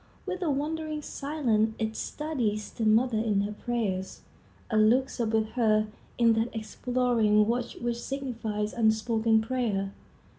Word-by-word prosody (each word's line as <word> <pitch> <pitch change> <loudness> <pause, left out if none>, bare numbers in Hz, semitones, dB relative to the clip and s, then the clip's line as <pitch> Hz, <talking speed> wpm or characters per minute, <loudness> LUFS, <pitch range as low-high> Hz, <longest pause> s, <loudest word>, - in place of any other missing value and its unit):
With 370 0 -4
a 345 - 0
wondering 305 +2 -2
silence 235 -9 0
it 220 -1 -2
studies 240 -9 -2
the 225 - -3
mother 225 +1 +3
in 215 -3 +1
her 205 +1 -2
prayers, 210 -4 -3 0.5
and 215 -1 +5
looks 260 +2 +1
up 230 -2 +1
with 220 0 +1
her 215 -3 +2 0.3
in 230 -1 +5
that 225 +2 -1
exploring 225 -1 +2
watch 240 +2 -1
which 235 0 -2
signifies 225 -6 -3
unspoken 220 0 +2
prayer. 220 -5 -1
225 Hz, 140 wpm, -28 LUFS, 215-250 Hz, 0.5 s, and